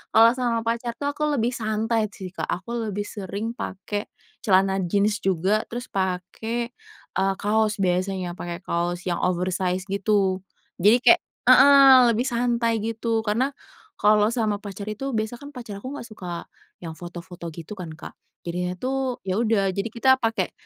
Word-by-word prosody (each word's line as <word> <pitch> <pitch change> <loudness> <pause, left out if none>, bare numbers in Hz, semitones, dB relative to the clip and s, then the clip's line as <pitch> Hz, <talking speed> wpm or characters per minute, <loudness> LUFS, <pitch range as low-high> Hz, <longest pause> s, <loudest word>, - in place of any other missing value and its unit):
kalau 230 +1 +8
sama 235 -2 0
pacar 235 +1 -2
tuh 285 0 -2
aku 300 +1 -1
lebih 235 0 +1
santai 220 -1 0
sih 185 -2 -8
Kak, - - -4
aku 225 +5 -3
lebih 205 0 -2
sering 205 +2 -5
pakai 205 +2 -4 0.3
celana 195 -1 +3
jeans 205 +4 +1
juga, 190 +3 +1
terus 245 +2 -6
pakai, 195 +6 -2 0.5
eee, 195 0 +2
kaos 215 0 +2
biasanya, 185 0 0
pakai 175 +1 -6
kaos 175 0 -2
yang 175 - -1
oversize 180 0 0
gitu, 195 -2 +1 0.4
jadi 210 +6 +6
kayak 350 - +7 0.3
heeh, 275 -1 +8 0.2
lebih 240 - +1
santai 235 -2 +1
gitu, 225 +1 -1
karena 250 +7 +1 0.5
kalau 210 0 +4
sama 220 -4 0
pacar 205 0 -8
itu, 265 +6 -4
biasa 220 +1 -2
kan 285 +1 -9
pacar 230 -7 -8
aku 270 +3 -5
gak 235 - -8
suka 180 -5 -7 0.3
yang 165 -2 -7
foto-foto 175 0 -8
gitu 170 +4 -8
kan 170 -3 -6
Kak, - - -9 0.3
jadinya 180 +1 -3
tuh 260 +1 -2
ya 190 +2 -1
udah, 215 -4 +2
jadi 200 +4 -2
kita 260 +2 +4
pakai 225 -1 0
210 Hz, 160 wpm, -24 LUFS, 185-235 Hz, 0.5 s, kalau